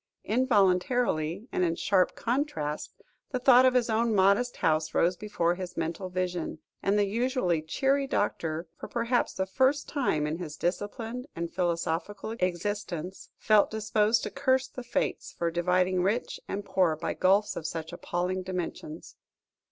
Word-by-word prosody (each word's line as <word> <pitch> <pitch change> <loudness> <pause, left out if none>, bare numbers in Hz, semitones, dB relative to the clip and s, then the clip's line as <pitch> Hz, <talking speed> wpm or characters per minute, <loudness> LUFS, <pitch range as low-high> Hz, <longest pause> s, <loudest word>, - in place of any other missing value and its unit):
Involuntarily, 205 - +2
and - - 0
in 165 -1 +1
sharp 185 +1 +2
contrast, 230 - -2 0.4
the 260 - -1
thought 255 0 +6
of 255 - +2
his 245 -2 +3
own 225 0 +1
modest 200 +6 +3
house 155 0 +1
rose 175 +2 +3
before 175 -4 0
his 180 0 -7
mental 165 +3 -3
vision, 180 -3 -2 0.2
and 200 +1 +2
the 205 - +3
usually 220 - 0
cheery 270 - +1
doctor, 165 - -1
for - - -6
perhaps 240 +1 0
the 190 - 0
first 260 +9 +1
time 245 - 0
in 155 +3 -3
his 155 -4 -6
disciplined 225 +7 -3
and 170 0 -4
philosophical 175 +4 -2
existence, 180 -1 -3
felt 215 -2 +4
disposed 215 +1 +1
to - - -4
curse 265 -1 +1
the 255 - -8
Fates, 240 - -2
for 170 -1 0
dividing 180 +2 +2
rich 210 +7 -1
and 200 0 -4
poor 180 -6 +2
by 160 - -3
gulfs 200 +3 +2
of 160 - -4
such 160 +1 -5
appalling 180 +2 -2
dimensions. 180 -3 -6
190 Hz, 150 wpm, -28 LUFS, 170-230 Hz, 0.4 s, thought